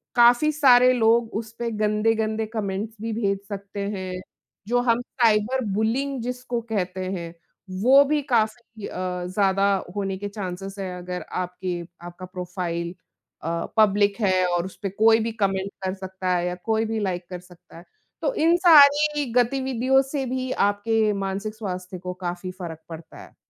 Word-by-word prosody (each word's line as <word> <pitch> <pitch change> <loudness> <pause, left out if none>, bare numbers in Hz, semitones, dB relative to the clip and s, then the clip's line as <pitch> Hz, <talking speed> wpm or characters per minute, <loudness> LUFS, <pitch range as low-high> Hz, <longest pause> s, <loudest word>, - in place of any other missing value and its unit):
काफ़ी 240 +5 +5
सारे 255 -4 +6
लोग 230 -1 +2
उसपे 230 +2 -4
गंदे-गंदे 215 +1 0
कमेंट्स 210 0 -3
भी 225 0 -3
भेज 200 -3 0
सकते 200 0 -7 0.2
हैं, 185 -1 -5 0.5
जो 245 +2 +2
हम 240 -1 +2
साइबर 240 0 +1
बुलीइंग 250 +6 -1
जिसको 250 -1 -3
कहते 185 -2 -2
हैं, 170 -3 -5 0.5
वो 270 +5 +7
भी 295 +1 +1
काफ़ी 220 -1 -1
अ, - - -8 0.3
ज़्यादा 195 +1 +2 0.3
होने 195 -1 -2
के 205 +1 -5
चांसेस 195 -1 -6
हैं, 185 -2 -4
अगर 180 0 -6 0.2
आपके 180 -1 -4 0.3
आपका 175 +1 -9
प्रोफ़ाइल 180 -2 -4 0.5
अ, 165 - -2 0.3
पब्लिक 205 -1 +4
है 185 -3 +3
और 175 0 0
उसपे 195 +1 -6
कोई 225 +3 +4
भी - - -2
कमेंट 195 0 0
कर 185 - -1
सकता 190 -1 -5
है 175 0 0
या 180 - -2
कोई 220 0 +1
भी 225 0 -2
लाइक 185 -3 -2
कर 180 -1 -6
सकता 180 -2 -17
है। 170 - -12 0.4
तो - - 0
इन 335 -5 +3
सारी 295 -3 +6
गतिविधियों 260 +1 +2
से 270 0 -3
भी 255 0 -3 0.2
आपके 215 +1 +1
मानसिक 195 +2 -3
स्वास्थ्य 185 -3 -5
को 180 0 -5
काफ़ी 180 +1 -4
फ़र्क 175 -4 -8
पड़ता 165 -1 -10
है। - - -17
210 Hz, 160 wpm, -24 LUFS, 185-235 Hz, 0.5 s, वो